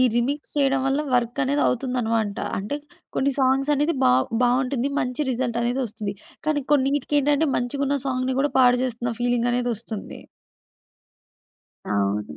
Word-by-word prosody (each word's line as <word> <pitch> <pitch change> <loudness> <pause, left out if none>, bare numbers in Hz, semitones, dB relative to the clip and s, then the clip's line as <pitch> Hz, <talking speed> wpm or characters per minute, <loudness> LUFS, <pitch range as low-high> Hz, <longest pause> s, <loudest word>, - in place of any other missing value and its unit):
Remix 270 +5 -1
చేయడం 275 -2 +2
వల్ల, 270 +2 +1 0.2
వర్కనేది 260 +4 +1
అవుతుందనమాట. 230 -5 0 0.2
అంటే 210 +9 -3 0.4
కొన్ని 275 +1 +2
సాంగ్సనేది 275 +4 +2
బా 125 - +5 0.3
బావుంటుంది. 250 +2 +1
మంచి 250 +4 -2
రిజల్టనేది 245 +1 -1
ఒస్తుంది. 210 -2 -5 0.3
కానీ, 295 -2 +1
కొన్నీటికేంటంటే 290 +2 +2
మంచిగున్న 280 +3 -1
సాంగ్‌ని 255 0 -1
గూడా, 285 -1 0
పాడుజేస్తున్న 245 -1 +2
ఫీలింగనేది 245 0 +1
ఒస్తుంది. 220 -1 -7 1.7
అవును. 100 -5 -1
255 Hz, 105 wpm, -24 LUFS, 235-275 Hz, 1.7 s, బా